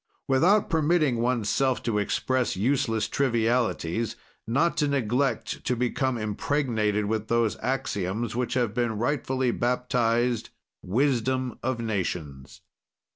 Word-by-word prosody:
"Without 180 +10 +4
permitting 155 -5 +2
oneself 125 +2 +1
to 110 -3 0
express 125 +3 0
useless 115 -1 +1
trivialities, 115 -5 0 0.3
not 145 +9 +2
to 150 - +2
neglect 135 0 -1
to 125 - 0
become 125 +1 0
impregnated 110 -1 0
with 110 +1 -2
those 115 -2 +1
axioms 110 -3 -2
which 125 0 -1
have 120 -4 +1
been 120 -2 -1
rightfully 130 +1 0
baptized, 120 -1 0 0.3
'wisdom 130 +2 0
of 130 -1 -1
nations.' 85 - -4
120 Hz, 110 wpm, -26 LUFS, 110-130 Hz, 0.3 s, Without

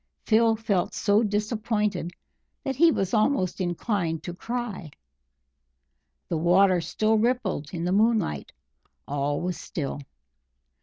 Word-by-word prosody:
Phil 225 0 +4
felt 205 -5 -1
so 205 0 +3
disappointed 210 -4 -1 0.5
that 270 - -2
he 335 +5 +6
was 195 - -1
almost 215 -5 +1
inclined 175 -2 -1
to 175 - -5
cry. 225 -4 -5 1.4
The 165 - -1
water 180 +2 +4
still 215 +5 +1
rippled 225 - -1
in 170 -1 -3
the 180 - 0
moonlight; 210 - +1 0.6
all 145 +1 -1
was 180 0 -2
still. 145 -2 -4
200 Hz, 115 wpm, -26 LUFS, 175-225 Hz, 1.4 s, he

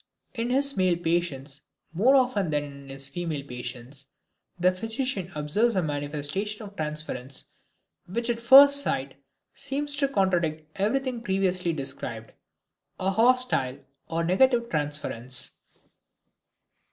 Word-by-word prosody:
In 235 -1 -2
his 280 +2 +3
male 185 -2 +2
patients 160 -5 -2 0.3
more 235 +11 +4
often 245 -9 +2
than 150 -1 0
in 140 -1 -11
his 135 0 -2
women 160 -5 -3
patients, 125 +2 -7 0.5
the 180 +1 +4
physician 220 -1 -3
observes 200 +11 +1
a 185 - +1
manifestation 150 +8 -3
of 200 -1 -11
transference 150 -5 -4 0.6
which 230 +6 -2
at 235 -1 -1
first 280 +4 +8
sight 135 - -3 0.3
seems 280 +1 -2
to 280 -1 +2
contradict 175 - 0
everything 245 +4 0
previously 190 -4 0
described: 120 -6 -5 0.7
a 190 +1 0
hostile 230 - +2 0.3
or 165 +1 -1
negative 235 +7 +3
transference. 145 -5 0
180 Hz, 115 wpm, -26 LUFS, 145-235 Hz, 0.7 s, first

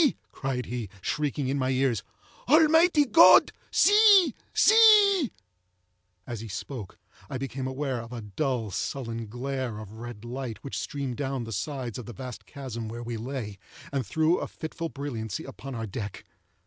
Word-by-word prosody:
cried 130 -3 -3
he, 120 -4 -5
shrieking 145 - -2
in 140 +2 -1
my 130 0 0
ears, 130 -4 +1 0.5
"Almighty 320 +1 +5
God! 330 +5 +7 0.2
see! 410 - +6 0.2
see!" 415 - +6 0.9
As 120 -3 -5
he 115 - -7
spoke, 105 0 -7 0.3
I 130 - -3
became 135 0 -4
aware 130 -2 -3
of 115 +1 -11
a 120 -2 -6
dull, 115 +1 -2
sullen 115 0 -4
glare 125 0 -4
of 105 -2 -9
red 120 -2 -8
light 120 -2 -5
which 140 - -4
streamed 135 -4 -4
down 135 -3 -2
the 115 - -7
sides 125 +2 -4
of 120 - -9
the 120 - -7
vast 125 +2 -8
chasm 125 -5 -6
where 120 +1 -6
we 120 0 -4
lay, 115 -4 -5 0.3
and 135 -2 0
threw 160 +5 +2
a - - -4
fitful 165 +1 -6
brilliancy 120 -9 -5
upon 135 -1 -8
our 115 -1 -3
deck. 105 -1 -6
130 Hz, 160 wpm, -27 LUFS, 115-145 Hz, 0.9 s, God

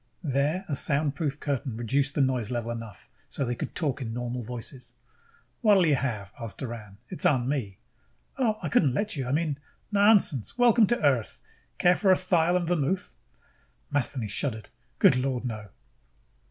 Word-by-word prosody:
There 150 +6 0
a 145 - -1
soundproof 145 +1 0
curtain 135 -5 -3
reduced 135 +4 0
the - - +2
noise 130 -5 0
level 120 -2 -2
enough 115 -4 -8 0.2
so 135 +2 -2
they 120 - -1
could - - -6
talk 145 -4 -1
in 115 -3 -4
normal 120 0 -3
voices. 125 +2 -7 0.7
"What'll 205 -6 +5
you 155 - +3
have?" 115 -7 -2
asked 115 -5 -7
Doran. 110 -6 -7
"It's - - -2
on 125 -4 +3
me." 120 -9 -2 0.6
"Oh, 225 -5 +1
I 160 - -1
couldn't 135 -3 +3
let 210 -1 -1
you. 135 -3 -3
I - - -2
mean 150 -1 0 0.2
" - - -41
"Nonsense. 200 - +4
Welcome 235 -3 +5
to 240 -8 0
Earth! 130 -6 +1 0.4
Care 175 0 +4
for 195 -1 +3
a 185 - +5
thyle 175 -2 +2
and 175 -2 -2
vermouth?" 175 +2 -1 0.7
Matheny 135 -4 -1
shuddered. 110 0 -2 0.3
"Good - - +5
Lord, 130 -1 -1
no!" 110 -3 -5
140 Hz, 170 wpm, -27 LUFS, 120-165 Hz, 0.7 s, What'll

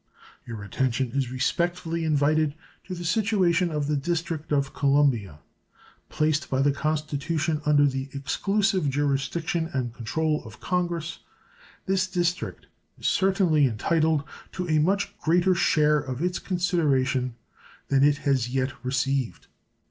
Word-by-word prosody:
Your 115 -4 -6
attention 125 +3 -1
is 135 -1 -1
respectfully 170 +5 -1
invited 155 0 +2 0.3
to 185 - -5
the 175 0 -6
situation 185 -3 +2
of 150 -2 -2
the 150 +1 0
District 160 +1 -2
of 140 -2 +1
Columbia. 135 - +2 0.7
Placed 155 -2 0
by 135 0 +1
the 145 - +4
Constitution 155 +1 -1
under 145 -1 +5
the 135 -1 -2
exclusive 190 +4 0
jurisdiction 145 +5 -1
and 125 -3 -2
control 150 +6 -1
of 110 -2 -12
Congress, 175 -2 -2 0.7
this 190 -1 +1
District 175 -1 -2 0.3
is - - -11
certainly 185 -7 +3
entitled 155 +6 +1 0.3
to 180 -1 -3
a 155 -2 +3
much 200 +6 +1
greater 175 +3 +3
share 150 -3 +3
of 130 -3 -5
its 180 0 -1
consideration 140 -9 0 0.5
than 135 -1 +3
it 145 0 +4
has 130 -4 +2
yet 130 +1 -1
received. 135 0 -1
150 Hz, 130 wpm, -26 LUFS, 135-175 Hz, 0.7 s, under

